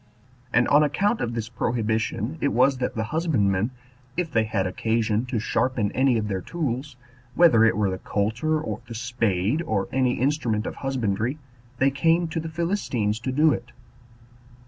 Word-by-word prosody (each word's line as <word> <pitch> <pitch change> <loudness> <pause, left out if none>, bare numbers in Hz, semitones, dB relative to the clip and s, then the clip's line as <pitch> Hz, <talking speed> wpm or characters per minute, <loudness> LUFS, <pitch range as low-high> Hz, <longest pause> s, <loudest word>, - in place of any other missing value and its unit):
And 120 0 +3
on 145 +1 +6
account 200 +10 +1
of 120 0 -2
this 115 -2 -3
prohibition 115 +3 -2
it - - +2
was 130 +1 +3
that 125 - -2
the 110 - -1
husbandmen, 110 - +1 0.5
if 175 -3 -1
they 110 -4 +2
had 105 -3 -1
occasion 110 +4 0
to 125 -2 -2
sharpen 110 -1 0
any 130 -2 +2
of 105 -1 -1
their 95 -2 -2
tools, 145 - -3 0.4
whether 145 -10 +6
it 110 -3 +2
were 100 -3 +1
the 95 - -4
coulter 115 +10 0
or 155 - -5
the 115 - -7
spade, 115 - 0
or 110 - -1
any 130 -1 +2
instrument 125 -5 0
of - - -5
husbandry, 120 -1 -1 0.4
they 135 +2 +3
came 165 +4 +2
to 165 - -2
the 160 0 -5
Philistines 155 - -1
to 130 +3 -3
do 150 +3 +4
it. 120 0 -7
120 Hz, 170 wpm, -25 LUFS, 110-145 Hz, 0.5 s, on